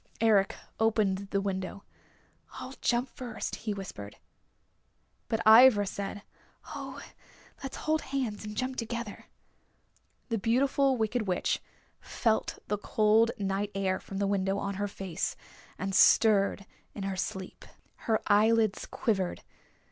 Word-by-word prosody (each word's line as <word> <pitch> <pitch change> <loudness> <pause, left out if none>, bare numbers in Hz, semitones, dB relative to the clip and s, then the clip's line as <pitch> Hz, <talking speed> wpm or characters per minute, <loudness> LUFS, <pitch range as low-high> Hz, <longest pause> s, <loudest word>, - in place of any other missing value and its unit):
Eric 210 -3 +3 0.2
opened 205 -3 +1
the 200 - +1
window. 195 0 -4 0.7
"I'll 260 - -7
jump 240 +2 +1
first," 240 -4 -6
he 220 - -4
whispered. 105 - -8 1.1
But 225 0 0
Ivra 220 -1 +8
said, 200 +1 -5 0.5
"Oh, - - -7 0.6
let's 270 - -6
hold 310 0 0
hands 255 -7 -3
and 210 0 -7
jump 260 0 -2
together." 235 -2 -5 1.0
The 225 -2 0
Beautiful 265 +4 +2
Wicked 220 0 -1
Witch 180 -1 0 0.4
felt 220 -2 -1
the 210 0 -1
cold 215 +2 +3
night 195 0 -1
air 190 -1 0
from 195 - -8
the 200 - +1
window 195 0 0
on 200 0 -2
her 205 +1 -2
face, 190 -4 -4 0.4
and 195 +1 -3
stirred 200 -1 +5 0.3
in 200 - -5
her 195 -1 -2
sleep. 190 0 -5 0.4
Her 220 -1 +3
eyelids 215 0 +3
quivered. 195 -6 -1
210 Hz, 125 wpm, -29 LUFS, 195-230 Hz, 1.1 s, Ivra